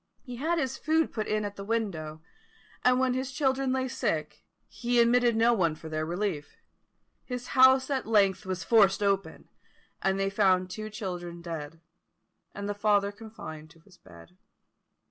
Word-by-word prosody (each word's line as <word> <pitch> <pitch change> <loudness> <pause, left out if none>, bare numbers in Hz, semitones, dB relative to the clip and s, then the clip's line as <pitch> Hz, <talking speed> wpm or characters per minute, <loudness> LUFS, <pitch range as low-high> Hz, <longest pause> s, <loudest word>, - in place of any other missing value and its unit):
He 250 -3 -8
had 325 +6 0
his 265 -5 -2
food 320 0 +1
put 215 -2 -3
in 215 -1 0
at 205 0 -6
the 200 - -6
window; 175 -8 -3 0.6
and 250 0 +4
when 260 -1 +2
his 260 +1 -3
children 265 -1 0
lay 260 0 0
sick, 250 - -3 0.2
he 240 0 -1
admitted 240 0 +4
no 230 +2 +4
one 170 -8 +1
for 160 +1 -10
their 155 0 -2
relief. 175 -4 -3 0.7
His 250 -1 -6
house 260 0 +6
at 265 -4 -1
length 200 -4 +3
was 185 -1 -4
forced 205 -3 +4
open, 195 -1 -1 0.5
and 195 0 +1
they 195 0 0
found 185 -3 +2
two 215 +2 -6
children 180 -5 -6
dead, 165 -1 -7 0.7
and 200 0 -5
the 205 - -1
father 205 -1 +2
confined 200 -8 -10
to 165 - -20
his 180 +1 -22
bed. 85 0 -16
205 Hz, 165 wpm, -28 LUFS, 180-245 Hz, 0.7 s, house